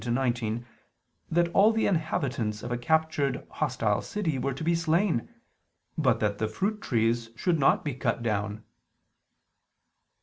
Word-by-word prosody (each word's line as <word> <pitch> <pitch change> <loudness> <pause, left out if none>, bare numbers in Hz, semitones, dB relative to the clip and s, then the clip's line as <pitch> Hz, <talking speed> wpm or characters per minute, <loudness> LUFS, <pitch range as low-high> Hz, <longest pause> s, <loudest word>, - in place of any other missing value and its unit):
20:13 120 - -1
19) 120 -2 -1 0.6
that 170 +1 +3
all 200 +5 +5
the 225 0 +1
inhabitants 130 - -1
of 120 - -5
a 120 - 0
captured 155 0 +1
hostile - - 0
city 165 -10 -2
were 140 - -1
to 135 +4 -5
be 170 +2 +2
slain, 165 - +1 0.7
but 125 -7 +2
that 105 -1 0
the 110 - +1
fruit 205 - -2
trees 115 -1 0
should 170 +5 +1
not 135 - +3
be 145 - -1
cut 120 -2 -1
down. 105 -1 -2
130 Hz, 145 wpm, -28 LUFS, 115-165 Hz, 0.7 s, all